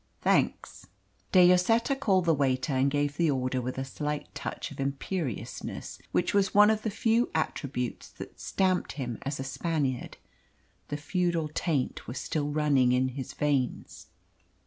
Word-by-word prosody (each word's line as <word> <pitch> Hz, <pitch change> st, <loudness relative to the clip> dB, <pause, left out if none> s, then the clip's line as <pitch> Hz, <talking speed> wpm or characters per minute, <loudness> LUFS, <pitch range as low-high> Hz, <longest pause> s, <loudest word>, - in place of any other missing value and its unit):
"Thanks." -, -, 0 dB, 0.4 s
De 180 Hz, -2 st, +7 dB
Lloseta 225 Hz, +9 st, +3 dB
called 195 Hz, -10 st, +2 dB
the 165 Hz, -, +4 dB
waiter 135 Hz, -1 st, +1 dB
and 130 Hz, +1 st, +3 dB
gave 145 Hz, +1 st, -1 dB
the 170 Hz, -2 st, +3 dB
order 130 Hz, -2 st, 0 dB
with 125 Hz, +1 st, -4 dB
a 135 Hz, -, -2 dB
slight 150 Hz, +2 st, -4 dB
touch -, -, -5 dB
of -, -, -11 dB
imperiousness 140 Hz, -, -4 dB
which -, -, +1 dB
was 200 Hz, -1 st, +2 dB
one 210 Hz, +1 st, +8 dB
of 215 Hz, -1 st, 0 dB
the 220 Hz, -, -1 dB
few 225 Hz, +3 st, +1 dB
attributes 140 Hz, -5 st, -2 dB
that -, -, -11 dB
stamped 185 Hz, -2 st, 0 dB
him 125 Hz, -5 st, -4 dB
as 140 Hz, 0 st, -4 dB
a -, -, -2 dB
Spaniard. 135 Hz, -2 st, -2 dB, 0.7 s
The 145 Hz, -, -3 dB
feudal 170 Hz, 0 st, -1 dB
taint 150 Hz, -7 st, -1 dB
was 120 Hz, -, -5 dB
still 150 Hz, -2 st, -2 dB
running 145 Hz, -4 st, +3 dB
in 130 Hz, +1 st, +2 dB
his 130 Hz, 0 st, -6 dB
veins. 140 Hz, -4 st, -1 dB
145 Hz, 155 wpm, -29 LUFS, 135-180 Hz, 0.7 s, one